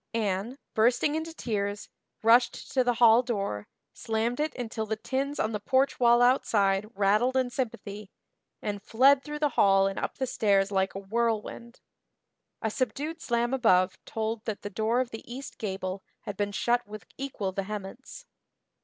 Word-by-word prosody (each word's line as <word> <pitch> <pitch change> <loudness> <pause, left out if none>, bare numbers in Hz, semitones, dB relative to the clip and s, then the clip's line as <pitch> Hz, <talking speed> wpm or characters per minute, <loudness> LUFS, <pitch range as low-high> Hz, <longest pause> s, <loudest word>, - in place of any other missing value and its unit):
Anne, 210 +3 -1 0.2
bursting 245 +6 +3
into 320 +1 -3
tears, 205 -8 -3 0.4
rushed 235 +2 +3
to 260 - +3
the 245 -1 +1
hall 235 0 +6
door, 200 - -3 0.3
slammed 225 +3 -2
it 305 0 0
until 225 -3 -4
the 220 - -1
tins 270 +5 -3
on 220 - 0
the 210 - -2
porch 265 +6 +1
wall 240 0 +5
outside 205 -5 +2
rattled 210 +6 +2
in 255 -1 +1
sympathy, 210 -5 -5 0.5
and 205 -1 -3
fled 265 +6 +4
through 300 0 -5
the 295 -1 +1
hall 195 -5 +4
and 195 0 -2
up - - -4
the 265 - 0
stairs 200 -4 +2
like 190 -1 0
a - - -3
whirlwind. 230 +3 -2 0.8
A 220 - 0
subdued 285 +8 -3
slam 240 -1 0
above 185 -8 +3
told 220 0 -3
that 220 -3 -4
the 205 - -5
door 225 +5 +1
of 250 - -4
the 225 +2 -9
east 265 +3 -8
gable 190 -2 -4 0.2
had 205 - -6
been 205 +1 -1
shut 240 +4 0
with 210 -2 -9
equal 255 -8 -3
vehemence. 205 - -6
225 Hz, 165 wpm, -28 LUFS, 200-250 Hz, 0.8 s, hall